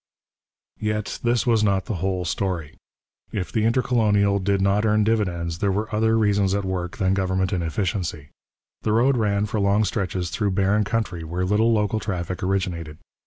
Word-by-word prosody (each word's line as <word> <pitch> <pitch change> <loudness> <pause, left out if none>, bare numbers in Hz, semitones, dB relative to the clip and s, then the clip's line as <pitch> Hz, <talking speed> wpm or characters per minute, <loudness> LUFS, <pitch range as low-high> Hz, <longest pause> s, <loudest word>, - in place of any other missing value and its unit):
Yet 105 -1 -2
this 120 0 +1
was 115 -3 +3
not 100 -2 +1
the 105 - -3
whole 95 -1 -1
story. 85 -3 -2 0.6
If 95 -3 -3
the 110 -1 +1
Intercolonial 110 -5 +2
did 100 +1 +1
not 100 +2 +2
earn 105 -1 +3
dividends, 90 -7 -1
there 100 0 +1
were 105 +3 -2
other 110 +1 +2
reasons 100 -3 +2
at 100 -1 -1
work 90 -2 -3
than 95 -2 +1
government 95 -1 0
inefficiency. 85 -3 -2 0.5
The 110 - 0
road 125 +4 +3
ran 105 -3 +1
for 110 +1 -2
long 100 +2 +3
stretches 90 -4 -2
through 105 -3 0
barren 100 +2 +2
country 105 -6 -2
where 85 +3 -2
little 105 +4 +3
local 105 -1 +1
traffic 90 -4 -4
originated. 90 -5 -2
100 Hz, 165 wpm, -23 LUFS, 90-105 Hz, 0.6 s, was